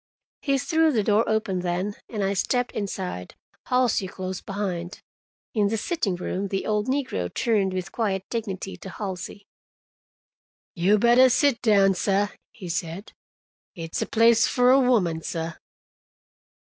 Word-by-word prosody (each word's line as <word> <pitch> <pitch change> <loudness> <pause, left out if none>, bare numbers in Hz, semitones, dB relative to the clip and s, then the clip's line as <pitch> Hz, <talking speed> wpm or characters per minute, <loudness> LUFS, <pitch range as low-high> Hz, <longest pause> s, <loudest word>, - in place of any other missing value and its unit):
He 275 -1 +1
threw 315 +3 +2
the 220 -6 +1
door 210 +2 +3
open 215 -4 0
then, 180 +3 -2 0.2
and 210 -4 -3
I 195 +1 +1
stepped 245 +5 0
inside, 185 - -5 0.3
Halsey 250 -6 +2
close 185 0 -5
behind. 195 -2 -4 0.5
In 210 -3 +2
the 225 +2 -1
sitting 220 - -1
room 185 +2 -3
the 195 0 -3
old 210 +1 0
negro 255 - -1
turned 205 -5 +1
with 185 0 -4
quiet 195 -5 -1
dignity 195 -4 -4
to 190 - -9
Halsey. 200 +1 -6 1.3
"You 190 +5 +3
bettah 240 +4 +6
sit 260 -1 +2
down, 200 -4 +4
sah," 200 +2 +1 0.2
he 190 -5 -10
said. 170 +3 -4 0.6
"It's 165 -1 -4
a - - -1
place 230 0 +4
for 250 0 +4
a 270 - +6
woman, 190 -11 +2
sah." 165 0 -4
205 Hz, 145 wpm, -25 LUFS, 185-235 Hz, 1.3 s, bettah